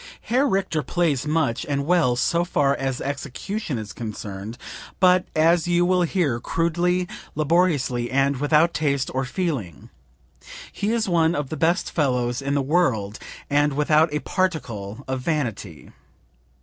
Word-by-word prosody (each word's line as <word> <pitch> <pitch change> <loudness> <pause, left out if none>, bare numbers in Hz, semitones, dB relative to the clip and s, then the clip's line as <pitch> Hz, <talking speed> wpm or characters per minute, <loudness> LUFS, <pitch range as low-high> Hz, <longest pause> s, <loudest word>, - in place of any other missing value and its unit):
"Herr 260 +5 +1
Richter 190 -6 0
plays 150 -4 0
much 150 -7 0
and 140 -1 -2
well 165 -7 +3
so 170 +7 +1
far 140 -5 +1
as 135 -2 -3
execution 145 - -4
is 105 -3 -6
concerned, 105 0 -6 0.4
but 185 -1 +5
as 165 +2 +3
you 175 0 +3
will 180 0 +2
hear 165 -8 0
crudely, 175 +5 0 0.3
laboriously 150 -6 +1
and 135 +1 +1
without 150 +4 +3
taste 140 -3 0
or 130 +1 -1
feeling; 130 - -4 0.8
he 205 +2 -2
is 230 -2 0
one 170 -2 +2
of 145 -2 -3
the - - -4
best 165 +4 +1
fellows 125 -4 0
in 140 +1 -1
the 140 - +1
world, 130 - 0 0.3
and 145 0 +2
without 150 +2 +3
a 150 - -2
particle 130 - -2
of 130 -1 -2
vanity. 115 - -3
150 Hz, 145 wpm, -23 LUFS, 130-175 Hz, 0.8 s, but